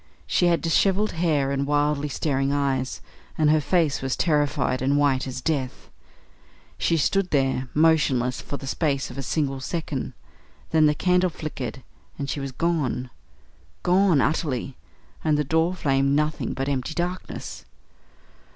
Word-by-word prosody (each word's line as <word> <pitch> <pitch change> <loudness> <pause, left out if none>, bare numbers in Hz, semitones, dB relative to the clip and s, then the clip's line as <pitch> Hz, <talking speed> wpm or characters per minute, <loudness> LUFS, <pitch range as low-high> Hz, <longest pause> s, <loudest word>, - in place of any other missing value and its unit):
She 175 - +2
had 170 -1 +2
dishevelled 195 +5 +2
hair 155 -5 +1
and 140 0 -1
wildly 145 0 +1
staring 135 -1 0
eyes, 135 -3 -1 0.4
and 150 -1 +4
her 155 0 +3
face 160 -2 +1
was 135 -1 -1
terrified 145 -5 +1
and 140 +2 +2
white 135 -3 +2
as 130 0 -5
death. 135 -4 -3 0.9
She 165 - +2
stood 190 +5 +1
there 135 -2 +1
motionless 150 -6 +3
for 140 - -5
the 135 - -9
space 140 -2 -1
of 130 - -7
a - - -1
single 135 0 -1
second. 150 -1 -4 0.6
Then 155 -1 +5
the 150 - +2
candle 180 +2 +2
flickered 135 -6 -6 0.3
and 140 -1 -3
she - - -3
was 135 -1 -4
gone 130 -5 -1 0.7
gone 180 -5 +4
utterly 135 -3 -1 0.5
and 155 -2 +2
the 150 - +1
door 160 +5 +1
framed 140 -3 +1
nothing 150 +1 0
but 135 0 -2
empty 140 +2 -2
darkness. 180 +1 -4
145 Hz, 150 wpm, -24 LUFS, 135-160 Hz, 0.9 s, Then